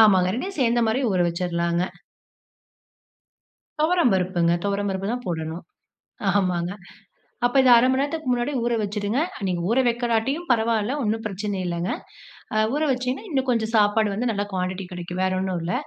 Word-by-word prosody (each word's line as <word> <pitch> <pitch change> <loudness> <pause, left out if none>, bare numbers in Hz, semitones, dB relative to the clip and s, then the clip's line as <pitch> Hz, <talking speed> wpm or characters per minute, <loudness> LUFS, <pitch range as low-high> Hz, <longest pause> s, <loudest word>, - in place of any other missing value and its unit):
ஆமாங்க, 190 -4 +6
2யும் 375 - -4
சேர்ந்த 240 0 +2
மாதிரி 225 +4 +1
ஊற 185 - +1
வச்சுரலாங்க. 170 0 -1 2.0
துவரம்பருப்புங்க. 190 - +2
துவரம்பருப்பு 200 0 -1
தான் 245 0 -5
போடணும். 160 0 -4 0.6
ஆமாங்க 180 -3 +1 0.7
அப்ப 245 - 0
இதை 260 - +4
1/2 235 +2 +5
மணி 260 - +1
நேரத்துக்கு 290 -1 -2
முன்னாடி 245 +4 0
ஊற 240 0 +1
வச்சுடுங்க. 210 +3 -1 0.3
நீங்க 180 -2 -1
ஊற 230 - +2
வைக்கலாட்டியும் 240 +7 0
பரவாயில்ல. 225 +1 +1
ஒண்ணும் 225 +1 -1
பிரச்சனை 205 0 -3
இல்லைங்க. 170 +1 -2 0.6
அ - - +1 0.2
ஊற 295 - 0
வச்சிங்கன்னா 255 - -2
இன்னும் 265 -4 0
கொஞ்சம் 225 -2 +1
சாப்பாடு 210 0 +3
வந்து 235 +5 -1
நல்ல 205 -2 -1
குவாண்டிட்டி 185 +1 -2
கிடைக்கும். 180 +1 -5
வேற 190 - +1
ஒண்ணும் 185 -2 -1
இல்ல. 175 +2 -2
210 Hz, 150 wpm, -24 LUFS, 185-245 Hz, 2.0 s, ஆமாங்க